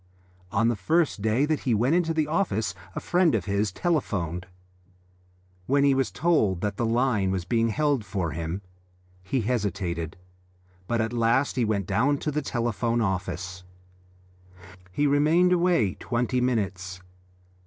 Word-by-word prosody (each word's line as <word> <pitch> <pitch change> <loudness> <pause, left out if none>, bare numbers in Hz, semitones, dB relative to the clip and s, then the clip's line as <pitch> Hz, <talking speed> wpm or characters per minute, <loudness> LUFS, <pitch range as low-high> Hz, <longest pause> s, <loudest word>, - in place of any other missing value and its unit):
On 115 +4 +2
the 120 - +2
first 155 - +1
day 110 +6 +2
that 155 0 0
he 120 -4 0
went 155 +10 +2
to 165 - 0
the 155 -1 +2
office 150 - 0 0.2
a - - -1
friend 175 -3 +2
of - - -1
his 100 0 0
telephoned 95 - -1
to 90 - -17
him. 90 - -26 1.1
When 140 +1 +3
he 140 -1 +5
was 135 -1 +1
told 125 - +1
that 105 -1 -1
the 115 +2 -1
line 115 -4 +1
was 95 -2 -2
being 115 +4 +1
held 145 0 +1
for 95 -4 -3
him 85 +5 -4 0.6
he 105 +8 -1
hesitated, 95 -8 -2 0.7
but 115 -1 +1
at 115 +1 -2
last 120 +4 +2
he 125 - +1
went 105 -3 0
down 125 +10 +2
to 150 - -3
the 150 +1 -1
telephone 120 -2 -1
office. 95 -3 -3 1.3
He 145 +10 0
remained 155 +6 +4
away 170 - +2
twenty 125 +1 -1
minutes. 95 -7 -1
115 Hz, 155 wpm, -26 LUFS, 95-140 Hz, 1.3 s, he